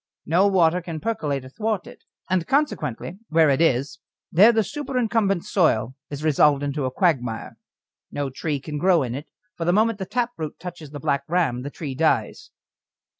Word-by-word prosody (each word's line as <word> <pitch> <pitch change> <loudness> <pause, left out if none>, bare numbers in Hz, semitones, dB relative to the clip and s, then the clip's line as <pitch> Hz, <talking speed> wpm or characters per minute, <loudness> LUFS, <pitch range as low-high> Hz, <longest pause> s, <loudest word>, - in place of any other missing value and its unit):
No 180 +6 +3
water 180 -2 +3
can 165 -2 -6
percolate 145 - -2
athwart 210 +8 -2
it, - - -14 0.2
and 180 -2 0
consequently 255 - -1
where 160 -2 +4
it 135 - +1
is, 140 -2 +1 0.3
there 205 +8 +7
the 220 -1 +2
superincumbent 225 - -1
soil 130 - +2 0.2
is 145 +1 -6
resolved 145 -2 +4
into 145 -1 -2
a 130 - -1
quagmire. 125 - -1 0.5
No 140 -2 -3
tree 145 +2 -2
can 150 +1 -5
grow 180 -2 +4
in 120 -2 -4
it, 145 +4 -7 0.3
for 170 - -4
the 175 +1 +2
moment 215 +1 +2
the 190 - -4
taproot 235 -10 -3
touches 175 -4 -8
the 145 0 -8
Black 140 +1 0
Ram 155 -8 +1
the 140 - -5
tree 145 -2 -6
dies. 155 +4 0
165 Hz, 175 wpm, -23 LUFS, 140-195 Hz, 0.5 s, there